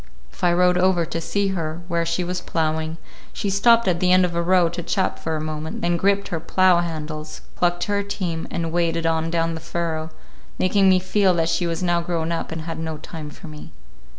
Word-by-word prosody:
If - - -15
I 175 - +5
rode 180 +1 +3
over 180 -2 +3
to 165 0 -4
see 200 +3 0
her 165 -2 -3
where 170 -2 0
she 170 +2 0
was 180 +1 -3
ploughing, 160 -1 -1 0.3
she 200 - -2
stopped 230 +3 +4
at 175 -2 +2
the 180 0 +2
end 185 0 +6
of 175 - -3
a 170 - +1
row 180 0 +4
to 170 +1 -5
chat 185 +2 -1
for 160 0 -2
a - - -2
moment, 155 0 -5
then 175 0 +2
gripped 200 +3 +1
her 165 - -2
plough 185 +2 +3
handles, 155 -2 -5
clucked 175 0 +1
to 205 - -3
her 200 0 +2
team, 185 -5 -3
and 165 -1 -3
waded 165 -1 0
on 165 0 +1
down 165 0 0
the 160 - -5
furrow, 165 -1 -3 0.5
making 195 +1 +3
me 185 - +6
feel 185 0 +2
that 165 -1 +1
she 175 +1 0
was 165 +1 -2
now 175 -1 +2
grown 170 -1 -2
up 165 - -3
and 160 0 -4
had 165 0 -5
no 160 -1 -4
time 155 0 -8
for 160 - -12
me. 150 -1 -11
170 Hz, 230 wpm, -22 LUFS, 160-185 Hz, 0.5 s, end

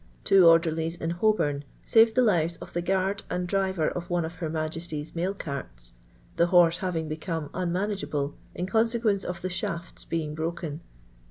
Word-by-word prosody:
Twu 195 -1 +6
orderhes 165 0 +4
in 165 - -2
Hciilvjm 175 -7 +1 0.2
^arctl 225 0 +6
the 255 - +5
lives 170 -6 +2
of - - -10
the 175 - 0
guard 190 +2 0
and 180 0 -1
driver 190 -3 0
uf 175 0 -5
one 175 -2 +1
of 165 +2 -7
ilcr 165 - -2
M. 155 - -5
^e^ly'« 155 -1 -4
mail 180 +4 -1
carts, - - -5 0.4
tne 170 - +5
horse 175 -1 +5
having 170 -4 -2
become 155 0 -4
un 180 -1 -1
niunageable 180 -7 -2 0.2
in 175 - -2
cnnseaucnec 225 -1 +2
of 180 -1 -5
the 185 - -1
shafts 170 -1 -4
being 155 -2 -2
broken. 160 -1 -4
170 Hz, 175 wpm, -27 LUFS, 160-190 Hz, 0.4 s, Twu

